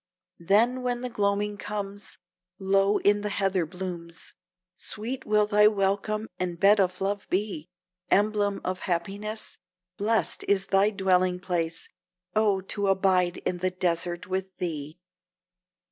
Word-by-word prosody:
Then, 225 +9 +3
when 245 -1 -1
the 250 -1 -4
gloaming 205 -2 0
comes, 205 0 -6 0.4
Low 195 +1 +2
in 205 0 +3
the 210 - -2
heather 195 -4 0
blooms, 175 -1 -7 0.4
Sweet 245 +5 -4
will 210 0 +4
thy 210 0 +5
welcome, 210 +1 0
and 175 -2 -3
bed 205 +2 +6
of 185 -1 +1
love 200 +1 -2
be! 185 -4 -2 0.4
Emblem 205 0 +2
of 185 0 -2
happiness, 200 +5 -3 0.4
Blest 220 +2 +1
is 195 -1 +2
thy 195 +2 +3
dwelling 185 -3 +2
place 170 -3 -2 0.5
Oh, 210 -3 +3
to 200 +1 -1
abide 190 -2 +2
in 180 - -1
the 185 +1 +1
desert 175 -1 -2
with 190 0 -4
thee! 155 -2 -4
195 Hz, 130 wpm, -27 LUFS, 180-210 Hz, 0.5 s, bed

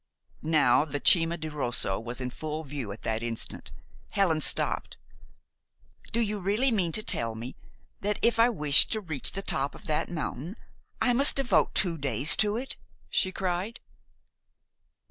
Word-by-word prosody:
Now, 150 -5 +3
the 145 -2 -5
Cima 165 +2 +5
di 155 - -6
Rosso 120 -10 +1
was 120 +3 -6
in 125 -1 -4
full 155 +3 -6
view 135 -7 -6
at 100 - -11
that 110 0 -2
instant. 115 -1 -2 0.4
Helen 175 -6 0
stopped. - - 0 1.1
"Do 235 - -1
you 210 -2 -2
really 210 +8 0
mean 185 -7 0
to 215 - -1
tell 115 - -2
me 120 +4 -8 0.4
that 205 +1 -2
if 230 0 +2
I 230 +2 +5
wish 150 - +5
to 220 - -1
reach 160 -9 +1
the 195 - -5
top 140 -6 -3
of - - -13
that 150 - -2
mountain, 160 - -5 0.4
I 245 - +2
must 275 +4 +6
devote 275 -3 +1
two 170 -4 0
days 140 +2 +3
to 210 0 +2
it?" 260 +3 -6 0.3
she 185 - +1
cried. 190 +4 -4
160 Hz, 165 wpm, -27 LUFS, 135-205 Hz, 1.1 s, must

